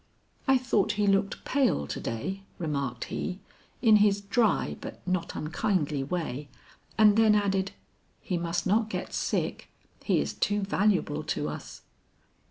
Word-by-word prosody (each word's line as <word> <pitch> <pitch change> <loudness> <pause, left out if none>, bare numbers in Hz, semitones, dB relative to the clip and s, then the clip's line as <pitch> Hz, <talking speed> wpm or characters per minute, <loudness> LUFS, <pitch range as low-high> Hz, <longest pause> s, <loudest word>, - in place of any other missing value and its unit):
'I 265 0 +6
thought 230 -6 +1
he 210 0 +1
looked 195 0 +1
pale 260 - +2
to - - -5
day,' 190 +13 -4 0.2
remarked 140 -7 -2
he, 185 - -4 0.4
in 220 -3 +7
his 205 -1 +4
dry 210 +2 +1
but - - -7
not 180 -2 -1
unkindly 155 -4 -1
way, 145 -3 -3 0.5
and 210 -2 +6
then 220 -1 +6
added, 195 -1 +1 0.5
'He 185 - -3
must 170 0 -1
not 215 +3 +2
get - - -4
sick; - - -2 0.3
he - - +2
is - - -2
too 205 0 0
valuable 195 -6 +1
to 150 -2 -1
us.' - - -8
195 Hz, 145 wpm, -28 LUFS, 165-210 Hz, 0.5 s, in